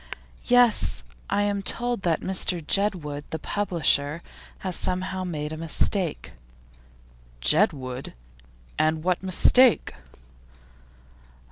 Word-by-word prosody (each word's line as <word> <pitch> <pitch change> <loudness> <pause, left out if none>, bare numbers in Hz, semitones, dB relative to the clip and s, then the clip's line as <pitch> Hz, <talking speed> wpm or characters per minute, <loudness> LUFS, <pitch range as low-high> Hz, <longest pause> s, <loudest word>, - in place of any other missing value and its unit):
'Yes. 245 - +3 0.3
I 205 - +1
am 205 -1 -1
told 240 +2 -1
that 170 -4 0
Mr 185 -1 0
Jedwood, 160 -4 -1
the 160 - -4
publisher, 165 -4 -1 0.4
has 185 -2 -1
somehow 185 +1 -1
made 155 -4 -5
a - - -6
mistake.' 165 +2 0 1.1
'Jedwood? 135 - 0 0.6
And 155 0 +1
what 180 0 0
mistake? 225 +6 +4
180 Hz, 95 wpm, -24 LUFS, 155-200 Hz, 1.1 s, mistake